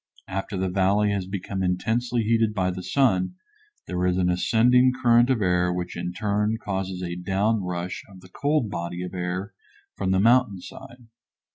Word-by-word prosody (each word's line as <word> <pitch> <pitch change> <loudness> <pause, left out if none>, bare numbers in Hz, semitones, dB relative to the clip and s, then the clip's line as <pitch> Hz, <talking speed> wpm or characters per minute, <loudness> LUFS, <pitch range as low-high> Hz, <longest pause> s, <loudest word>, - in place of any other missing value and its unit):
After 95 +1 -4
the 95 0 0
valley 100 +3 +2
has 100 -2 -2
become 95 0 -4
intensely 110 +6 0
heated 115 -1 +1
by 95 -2 +1
the 90 +1 -6
sun 110 - +1 0.5
there 90 0 -2
is 90 0 +1
an 90 -1 +2
ascending 125 +7 +4
current 120 +1 +5
of 120 -6 +1
air 90 -1 +2
which 90 0 -4
in 90 +1 -3
turn 105 +3 0
causes 95 -4 -4
a 85 -1 -4
down 100 +5 0
rush 90 0 -4
of 95 -2 -14
the 95 - -16
cold 145 0 0
body 85 +1 -4
of 90 - -7
air 90 +2 -3 0.4
from 95 - -2
the 95 0 +3
mountain 115 -2 +3
side. 125 +5 -12
95 Hz, 175 wpm, -25 LUFS, 90-115 Hz, 0.5 s, current